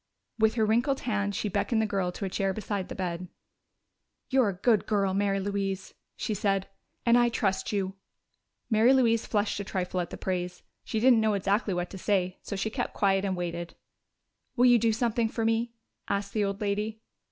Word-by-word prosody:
With 220 +1 +3
her 220 -2 +3
wrinkled 240 +6 +1
hand 205 -4 -1
she - - -1
beckoned 220 +3 0
the 220 - +2
girl 195 -3 -1
to 200 - -4
a - - -2
chair 195 0 -1
beside 205 -3 -3
the - - -6
bed. 180 -1 -3 1.0
"You're 260 -5 +4
a - - -2
good 210 +2 +2
girl, 200 -3 +1
Mary 195 0 +1
Louise," 195 -1 -3 0.2
she 215 - -2
said, 195 -1 0 0.4
"and 235 0 +6
I 240 0 +4
trust 195 -5 -1
you." 195 -2 -1 0.7
Mary 225 +3 +5
Louise 230 -4 +3
flushed 205 -1 0
a - - -2
trifle 185 -2 -2
at 175 - -5
the - - -7
praise; 180 -1 -3 0.2
she 220 - -2
didn't 240 -1 +5
know 215 -1 +2
exactly 200 0 0
what 175 0 -3
to 190 - -7
say, 185 -2 0
so - - -5
she 210 +3 -2
kept 245 +1 -3
quiet 195 -1 +2
and 190 -2 -1
waited. 170 -1 -4 0.8
"Will 250 -1 +4
you 245 -1 +7
do 225 0 +3
something 230 0 +1
for 225 0 -2
me?" 230 +1 0 0.3
asked 200 0 -2
the 210 -2 +1
old 200 +2 -3
lady. 210 +2 -2
205 Hz, 200 wpm, -28 LUFS, 190-225 Hz, 1.0 s, you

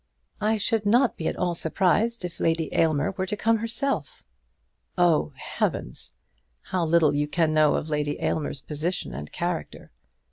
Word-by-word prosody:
"I 220 +1 +2
should 215 0 0
not 240 +4 +4
be 160 - -3
at - - -1
all 180 -1 0
surprised 190 +6 +1
if 175 - -7
Lady 165 -1 0
Aylmer 155 -2 +2
were 190 -1 -3
to 210 - -2
come 225 +2 +2
herself." 230 - -2 0.7
"Oh, 165 - +3
heavens! - - -3 0.5
How 185 -2 -1
little 160 -2 +4
you 145 +1 0
can 160 0 +1
know 155 -1 +4
of - - -2
Lady 150 -1 -1
Aylmer's 145 -3 -2
position 155 - -2
and 75 +4 -7
character!" 175 -1 -4
170 Hz, 155 wpm, -26 LUFS, 155-205 Hz, 0.7 s, not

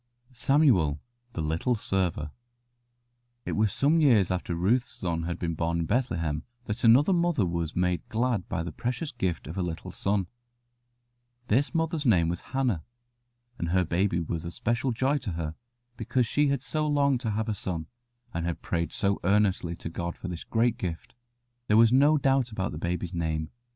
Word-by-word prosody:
SAMUEL, 120 - +3 0.3
THE 80 - -3
LITTLE 80 +11 0
SERVER 90 -8 -1 1.1
It - - -3
was 105 -1 +2
some 155 +4 +3
years 115 - +4
after 90 -1 -2
Ruth's 115 +10 +1
son 85 -2 -3
had 85 0 -3
been 85 -2 -2
born 85 +1 -1
in - - -1
Bethlehem 85 - 0 0.2
that 105 - -3
another 130 +10 +6
mother 170 - +2
was 85 -2 -2
made 90 -1 0
glad 115 -4 0
by 90 -4 -1
the 85 - -5
precious 125 - -3
gift 95 -8 -2
of 80 +6 -5
a - - +1
little 85 -2 -4
son. 100 -1 0 1.2
This 140 - +2
mother's 165 -1 +1
name 90 - +4
was 85 +1 -3
Hannah, 125 - 0 0.8
and 85 - -2
her 90 +1 +2
baby 90 +1 +1
was 85 0 -3
a 85 - -4
special 120 +8 -1
joy 135 +5 +1
to 105 -10 -4
her 80 -2 -3 0.4
because 120 +2 0
she 145 +6 +2
had 140 -2 0
so 150 +5 -1
longed 140 -3 +2
to 115 - -2
have 110 +1 -1
a 110 - 0
son 90 -5 -4 0.5
and 85 - -2
had 85 -1 -3
prayed 85 -1 -1
so 100 0 0
earnestly 95 -3 +2
to 85 - -7
God 85 +1 -4
for 95 - -6
this 85 -1 -5
great 115 +1 +1
gift. 85 -3 -5 0.5
There 105 - +4
was 115 +1 +6
no 145 +4 +5
doubt 135 -3 +2
about 95 -3 -2
the 75 - -6
baby's 90 +1 -2
name. 80 -2 -2
100 Hz, 180 wpm, -28 LUFS, 85-125 Hz, 1.2 s, another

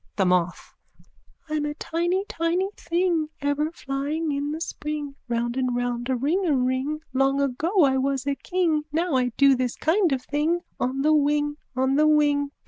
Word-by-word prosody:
THE 195 - +2
MOTH: 180 -1 0 0.7
I'm 305 -1 -1
a 295 0 -3
tiny 345 +5 -1
tiny 340 +4 0
thing 340 -2 0
Ever 285 +2 0
flying 295 +1 -3
in 285 +1 -2
the 315 - -4
spring 300 -3 -4 0.2
Round 235 0 -1
and 255 -2 0
round 245 0 -2
a 260 - +2
ringaring. 280 -1 0
Long 270 +1 +2
ago 310 +8 +2
I 265 -2 +3
was 270 0 -1
a 280 - +1
king 325 +2 0
Now 330 +2 0
I 255 -1 +2
do 275 -1 +6
this 250 -1 -1
kind 345 +1 +2
of 260 -2 -1
thing 310 +5 0 0.2
On 265 +2 -1
the 310 +1 +4
wing, 295 0 +2 0.2
on 265 +1 +1
the 305 +1 +5
wing! 290 -2 +3
290 Hz, 170 wpm, -25 LUFS, 265-315 Hz, 0.7 s, do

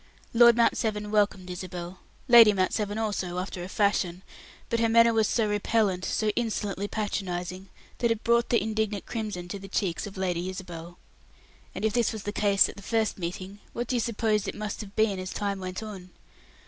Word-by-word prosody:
Lord 235 0 +7
Mount 235 - +4
Severn 210 -1 -2
welcomed 205 -3 +1
Isabel; 180 0 -6 0.3
Lady 235 -4 +9
Mount 185 -1 +1
Severn 210 -1 -2
also, 200 -5 -2
after 180 -1 -4
a 180 - -7
fashion; 190 -3 0 0.4
but 230 - 0
her 230 0 +2
manner 230 0 +6
was 220 -2 +3
so 225 -3 +1
repellant, 205 -2 +1
so 215 - 0
insolently 205 -3 -2
patronizing, 185 -3 -3 0.3
that 235 - +2
it 230 -1 -1
brought 235 0 +3
the 235 - +4
indignant 215 -2 -2
crimson 210 -6 -4
to 200 - -5
the 195 - -9
cheeks 195 -1 -1
of 195 - -10
Lady 180 -1 -1
Isabel. 175 -2 -8 0.8
And - - -2
if 220 - +1
this 240 -1 +2
was 220 -2 -6
the 205 - -3
case 200 -2 +3
at - - -10
the - - -9
first 220 0 0
meeting, 185 +3 -5
what 240 - -2
do 250 - -2
you - - +2
suppose 220 -2 0
it - - -4
must 210 0 -4
have 205 -1 -11
been 215 -3 +2
as 185 0 -5
time 200 -2 -2
went 185 +2 -5
on? 195 -4 -8
205 Hz, 200 wpm, -27 LUFS, 185-220 Hz, 0.8 s, Lady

